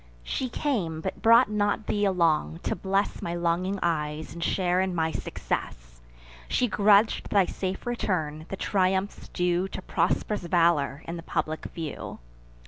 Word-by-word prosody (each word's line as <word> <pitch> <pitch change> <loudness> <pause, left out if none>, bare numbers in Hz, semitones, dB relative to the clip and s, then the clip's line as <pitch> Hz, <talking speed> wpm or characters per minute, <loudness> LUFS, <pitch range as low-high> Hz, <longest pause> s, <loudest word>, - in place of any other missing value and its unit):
She 255 - -2
came; 205 - -1
but - - -5
brought 230 +3 +7
not 205 0 0
thee 205 0 +1
along, 170 -3 +1
to - - -1
bless 195 +3 -1
My 170 - -3
longing 175 +3 0
eyes, 155 -2 -1
and 170 0 -5
share 180 0 +1
in 190 -1 -1
my 160 -1 +1
success: - - -4 0.5
She 250 - +1
grudg'd 205 +1 +4
thy 200 -2 +4
safe 190 +1 -4
return, 160 -10 -2
the 195 - -4
triumphs 190 0 0
due 180 +1 0
To - - -6
prosp'rous 210 -1 0
valour, 165 -5 +2
in 170 +1 -4
the - - -6
public 155 -1 -3
view. 160 -4 -6
180 Hz, 150 wpm, -27 LUFS, 160-200 Hz, 0.5 s, brought